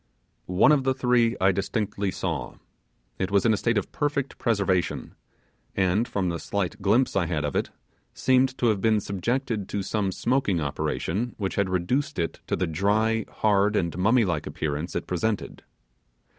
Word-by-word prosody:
One 90 +11 +4
of 145 -3 +3
the 130 0 +1
three 125 -2 +2
I 95 +1 +4
distinctly 100 +1 -2
saw. - - -3 0.6
It 95 - -1
was 100 +1 +2
in 115 - +5
a - - +1
state 115 +2 +1
of 105 - -2
perfect 145 -2 -2
preservation, 100 -6 0 0.6
and 95 +5 +2
from 100 -7 -1
the 85 -1 -3
slight 100 +1 -3
glimpse 110 +7 +2
I 90 -4 +2
had 80 -3 -1
of 70 - -3
it, - - 0 0.4
seemed 130 0 +2
to - - 0
have 105 -3 0
been 110 0 +3
subjected 110 +2 -2
to 100 - -2
some 100 -1 -1
smoking 120 -4 0
operation 90 +9 -2
which 95 -3 -2
had 100 -2 0
reduced 110 - -1
it 85 -2 -2
to - - 0
the 90 - 0
dry, 105 +6 +1
hard, 105 0 +2
and 85 -5 0
mummy 110 +6 +3
like 80 -5 -2
appearance 75 +2 -3
it - - -2
presented. 100 +4 -2
100 Hz, 170 wpm, -26 LUFS, 95-115 Hz, 0.6 s, in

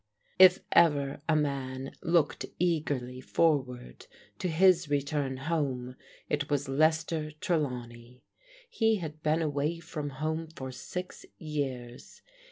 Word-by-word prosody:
If 185 -1 +8
ever 145 -4 +3
a 160 - +4
man 135 -3 -2
looked 165 -3 +1
eagerly 145 -7 -1
forward 130 - 0 0.3
to - - -1
his 175 -1 +4
return 140 -1 -1
home 130 -4 -2 0.3
it 145 -1 -1
was 145 -1 0
Lester 155 +2 +1
Trelawney. 125 -7 -3 0.4
He 225 - +2
had 155 -5 -6
been 155 +2 +1
away 150 +2 -1
from 150 -3 -5
home 160 +2 -2
for 130 -5 -7
six 180 +8 -7
years. 135 -6 -5
150 Hz, 115 wpm, -29 LUFS, 130-165 Hz, 0.4 s, If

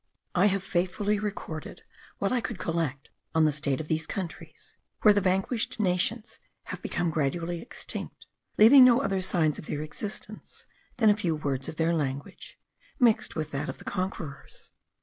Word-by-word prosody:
I 185 +3 +4
have 195 -1 0
faithfully 195 +3 0
recorded 200 -7 -5 0.3
what 200 - 0
I 250 - +1
could 230 -3 -4
collect 160 -6 -2 0.2
on 160 -1 +5
the 155 - +4
state 140 -2 -1
of 155 - -5
these 160 0 -1
countries, 185 -4 -7 0.3
where 210 - +8
the 205 - +2
vanquished 195 +6 0
nations 210 +4 0 0.2
have - - -7
become 170 -2 -1
gradually 165 +3 -1
extinct, 235 - -8 0.3
leaving 255 +5 +9
no 250 +1 +6
other 195 -6 0
signs 165 -5 +1
of - - -10
their 150 0 -3
existence 200 +7 -8 0.3
than 220 -3 +6
a - - +3
few 175 -6 -1
words 135 -3 -2
of - - -7
their 165 +1 +1
language, 140 -3 -4 0.4
mixed 235 -4 +3
with 155 -1 -3
that 145 +3 -3
of - - -5
the - - -14
conquerors. 180 -7 -5
175 Hz, 170 wpm, -28 LUFS, 155-205 Hz, 0.4 s, leaving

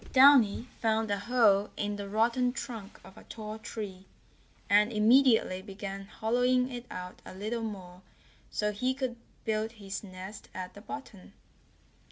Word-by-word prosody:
Downy 260 -4 +6
found 220 -1 +1
a 200 - 0
hole 210 -3 +4
in 205 0 -1
the 200 -1 -6
rotten 235 +4 +2
trunk 225 -7 -7
of 190 - -13
a - - -15
tall 215 -1 -7
tree, 205 -4 -7 0.6
and 210 +3 +5
immediately 225 -3 +4
began 195 0 -6
hollowing 250 +4 +1
it 245 0 -7
out 180 0 -7
a - - -10
little 215 +4 -3
more 185 -5 -7 0.5
so 210 0 0
he 255 +5 0
could 260 -3 -2 0.3
build 220 0 -1
his 200 -3 -6
nest 190 +1 -9
at 185 -1 -5
the 205 - -11
bottom. 225 -7 -9
215 Hz, 150 wpm, -30 LUFS, 200-240 Hz, 0.6 s, Downy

